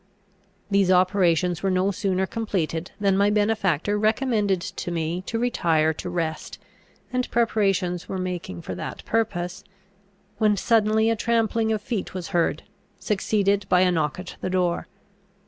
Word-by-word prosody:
These 195 -2 +3
operations 180 -2 +3
were 195 - +1
no 185 +1 +2
sooner 190 -1 0
completed 185 -6 -2
than 200 -2 +2
my 200 +1 +3
benefactor 205 -3 +1
recommended 215 -3 +1
to 195 -2 -5
me 170 +1 -2
to 230 - -2
retire 165 -10 +2
to 180 - -6
rest, 165 -3 -3 0.6
and 250 0 -1
preparations 195 -6 0
were 190 - -3
making 180 - -4
for - - -5
that - - -7
purpose, 195 -6 -1 0.8
when 210 -2 +3
suddenly 220 +1 +3
a - - +1
trampling 225 0 +1
of 215 -2 -1
feet 215 -6 -4
was 180 -2 -5
heard, 165 -3 0 0.3
succeeded 200 -1 0
by 180 - +5
a 185 -1 +4
knock 155 -2 0
at 180 0 -8
the - - -2
door. 180 -2 0
190 Hz, 145 wpm, -24 LUFS, 175-215 Hz, 0.8 s, by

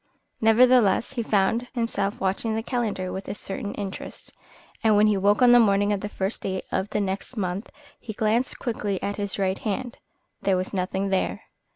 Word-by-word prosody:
Nevertheless, 235 0 +4
he 245 - -1
found 220 +3 +1
himself 210 -4 -1
watching 195 +4 -1
the 225 - -2
calendar 220 -7 -2
with 190 - -6
a - - -4
certain 200 0 -5
interest, 195 -2 -7 0.5
and 220 -1 +5
when 210 - +5
he 210 -1 +3
woke 205 +5 +3
on 245 - +7
the 245 - +8
morning 205 -2 +3
of 200 - -2
the 205 - -4
first 195 +1 -3
day 190 -1 -3
of 190 - -1
the 210 - -1
next 195 +5 -3
month 190 +1 -3 0.3
he 230 - -7
glanced 225 +3 0
quickly 210 -6 -2
at 200 - -2
his 200 -2 -3
right 190 -1 0
hand. 235 +3 -4 0.4
There 195 -2 +2
was 185 +2 -3
nothing 190 +1 -1
there. 190 -1 -1
205 Hz, 190 wpm, -25 LUFS, 195-225 Hz, 0.5 s, the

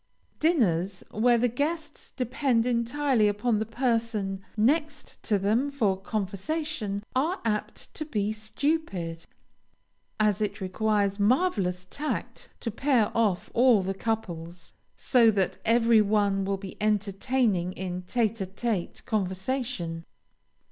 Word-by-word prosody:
Dinners 195 - +1
where 240 +3 +3
the 245 +2 +3
guests 300 +5 -3
depend 250 -1 0
entirely 245 0 +2
upon 210 +2 +1
the 220 - -2
person 225 -5 -1 0.2
next 295 +7 0
them 215 +6 +2
for 225 -9 +1
conversation, 205 - -3
are 315 +9 +1
apt 210 -2 -3
to 310 - -4
be 210 -8 -1
stupid, 215 - -2 0.9
as 210 -1 +2
it 210 -1 -1
requires 200 +1 0
marvelous 200 - +1
tact 295 +9 -4
to 230 - -2
pair 245 -1 +1
off 210 -6 +1
all 240 -5 +5
the 190 +1 -1
couples, 175 -6 -4 0.2
so 240 -4 +4
that 195 -4 0
every 230 -1 +5
one 200 -2 +2
will 195 0 -1
be 195 -1 -9
entertaining 210 -1 +1
in 180 -1 -4
tête 225 +3 0
à - - -5
tête 195 -1 -3
conversation. 190 -3 -2
215 Hz, 120 wpm, -27 LUFS, 195-250 Hz, 0.9 s, all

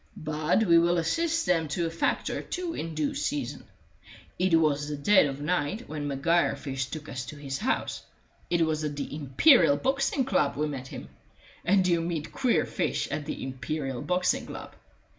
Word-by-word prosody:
But 155 +6 +1
we 170 -5 +6
will 175 +1 +3
assist 330 - 0
them 165 -3 +2
to 165 +4 -1
a 165 - -2
fact 165 - 0
or - - -3
two 355 -2 -4
in 165 - -5
due 155 -2 0
season. 140 -1 -3 0.7
It 185 -2 +3
was 150 -2 +2
the 150 - -3
dead 190 +3 +5
of 135 0 -5
night 180 +7 -1
when 150 -1 -4
Maguire 155 +5 +2
first 135 -2 -4
took 155 -1 -6
us 130 -1 -5
to - - -7
his 140 -2 -5
house; 250 - -1 0.5
it 170 -1 +3
was 155 -1 -1
at 150 -1 -2
the 145 0 -5
Imperial 150 - +5
Boxing 270 - 0
Club 150 -9 +1
we 150 +1 0
met 135 -3 -5
him; - - -9 0.5
and 185 +1 +3
you 170 -2 +2
meet 165 -2 -3
queer 255 -3 +1
fish - - -2
at 150 -1 -4
the - - -4
Imperial 135 0 -4
Boxing 180 0 0
Club. - - -8
155 Hz, 185 wpm, -28 LUFS, 145-180 Hz, 0.7 s, we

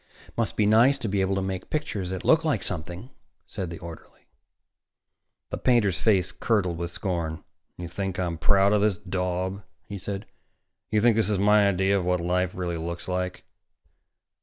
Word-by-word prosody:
"Must 115 -1 -1
be 105 - +3
nice 115 +6 +5
to 120 - -4
be 100 -1 0
able 95 +1 +1
to 95 - -1
make 95 -1 -4
pictures 130 -12 -2
that 95 -1 -5
look 160 0 +5
like 145 -10 0
something," 90 - -6 0.3
said 90 -3 -5
the 85 - -6
orderly. 85 -1 -12 1.2
The - - -3
painter's 115 -7 +2
face 95 -5 +3
curdled 95 -7 0
with 85 0 -3
scorn. 85 -3 -3 0.3
"You 90 - -6
think 95 +2 -4
I'm 85 -3 -2
proud 100 +3 +4
of 105 - +3
this 105 -3 +2
daub?" 95 0 -2 0.3
he 100 -1 -6
said. 100 +2 -5 0.6
"You 105 -1 +2
think 120 -1 +5
this 110 -2 +2
is 105 - +1
my 105 +1 +5
idea 95 +1 +2
of - - -3
what 90 0 +1
life 90 +1 0
really 85 -2 -2
looks 85 +2 -5
like?" 90 0 -3
95 Hz, 180 wpm, -26 LUFS, 90-105 Hz, 1.2 s, nice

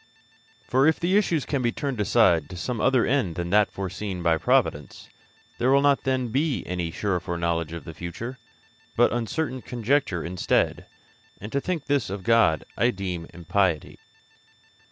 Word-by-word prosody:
For 135 +3 +3
if 160 - +2
the 180 +3 +1
issues 175 -8 +2
can 140 -3 -1
be 120 -1 +1
turned 135 -5 -3
aside 95 -8 +3
to 90 - -8
some 115 +5 -3
other 130 -2 +3
end 115 - 0
than 85 0 -4
that 105 0 +4
foreseen 95 -1 -5
by 80 -1 +2
providence, 75 -1 0 0.5
there 125 - +2
will 140 +1 +4
not 140 -1 +3
then 130 -2 0
be 140 +4 0
any 90 -2 -3
sure 90 +2 -1
foreknowledge 85 -2 -2
of 85 0 -7
the 80 - -9
future, 115 +11 -7 0.6
but - - +4
uncertain 130 +3 -2
conjecture 120 - 0
instead, 90 +2 0 0.5
and 105 +3 -8
to 140 - 0
think 175 -3 -3
this 140 -7 0
of 95 0 -5
God 115 -9 +3
I 120 - +3
deem 90 -6 -4
impiety. 90 -1 -1
105 Hz, 165 wpm, -25 LUFS, 85-130 Hz, 0.6 s, that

